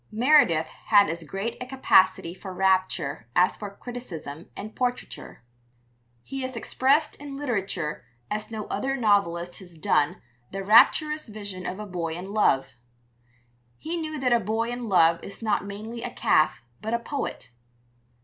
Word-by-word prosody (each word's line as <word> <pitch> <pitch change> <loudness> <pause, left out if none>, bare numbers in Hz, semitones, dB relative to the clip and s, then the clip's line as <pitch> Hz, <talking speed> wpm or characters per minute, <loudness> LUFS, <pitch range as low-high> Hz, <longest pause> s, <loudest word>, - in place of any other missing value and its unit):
Meredith 225 - +4 0.2
had 205 -2 +6
as 165 0 -5
great 195 - -4
a 250 - -5
capacity 190 -9 +3
for 190 +1 -9
rapture 185 -9 0
as 180 +1 +4
for 205 - -6
criticism 170 - -8
and 215 +1 -7
portraiture. 250 - -4 0.8
He 270 0 -5
has 260 -1 -4
expressed 275 +6 +1
in 280 -1 -8
literature 195 - -2 0.3
as 215 0 -2
no 220 -2 -5
other 270 +1 -2
novelist 180 -6 +1
has 175 -4 -13
done 150 -1 +1 0.3
the 195 0 -5
rapturous 300 +9 +5
vision 205 -4 -6
of 185 - -5
a 210 - -5
boy 170 -4 -3
in 185 +3 -7
love. 135 -11 +3 1.1
He 325 +2 -4
knew 310 -2 -4
that 250 -2 +2
a 235 - +5
boy 225 +3 -1
in 245 -2 -4
love 170 -3 +4
is 200 +3 -9
not 210 -3 +1
mainly 220 +4 -7
a 245 - -3
calf 155 - +2 0.2
but 220 +2 -1
a - - -1
poet. 235 - -5
210 Hz, 155 wpm, -26 LUFS, 180-245 Hz, 1.1 s, had